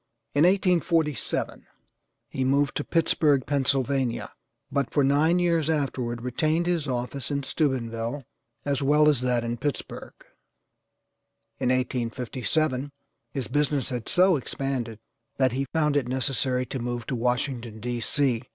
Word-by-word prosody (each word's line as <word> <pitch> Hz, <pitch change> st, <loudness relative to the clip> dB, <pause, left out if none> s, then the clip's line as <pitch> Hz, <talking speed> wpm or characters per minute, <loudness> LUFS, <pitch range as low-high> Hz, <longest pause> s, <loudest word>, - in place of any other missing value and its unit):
In 145 Hz, +3 st, +4 dB
1847 175 Hz, -, +1 dB, 0.6 s
he 130 Hz, -, -2 dB
moved 140 Hz, +2 st, +2 dB
to 145 Hz, -, -2 dB
Pittsburgh, 150 Hz, -5 st, +2 dB
Pennsylvania, 135 Hz, -3 st, 0 dB, 0.4 s
but 140 Hz, -3 st, 0 dB
for 145 Hz, -, +2 dB
nine 150 Hz, +5 st, +3 dB
years 170 Hz, -3 st, +2 dB
afterward 130 Hz, -6 st, -1 dB
retained 155 Hz, +7 st, 0 dB
his 170 Hz, -4 st, 0 dB
office 125 Hz, 0 st, -3 dB
in 140 Hz, -1 st, -1 dB
Steubenville, 130 Hz, -2 st, -2 dB, 0.4 s
as 140 Hz, -1 st, 0 dB
well 150 Hz, +2 st, +4 dB
as 145 Hz, -5 st, +3 dB
that 125 Hz, -2 st, +1 dB
in 120 Hz, 0 st, -2 dB
Pittsburgh. 145 Hz, +4 st, -4 dB, 1.4 s
In 125 Hz, -, +1 dB
1857 130 Hz, +3 st, -1 dB, 0.4 s
his 135 Hz, -4 st, -3 dB
business 145 Hz, -2 st, 0 dB
had 120 Hz, -3 st, -4 dB
so 185 Hz, -2 st, +5 dB
expanded 130 Hz, -4 st, -3 dB, 0.4 s
that 130 Hz, -2 st, +3 dB
he 135 Hz, +3 st, -1 dB
found 150 Hz, +1 st, 0 dB
it 140 Hz, -4 st, +1 dB
necessary 130 Hz, 0 st, 0 dB
to 130 Hz, +2 st, -5 dB
move 120 Hz, 0 st, -3 dB
to 130 Hz, -, -2 dB
Washington, 120 Hz, -2 st, -1 dB
D. 120 Hz, +2 st, -3 dB
C. 125 Hz, 0 st, +1 dB
135 Hz, 135 wpm, -26 LUFS, 125-150 Hz, 1.4 s, so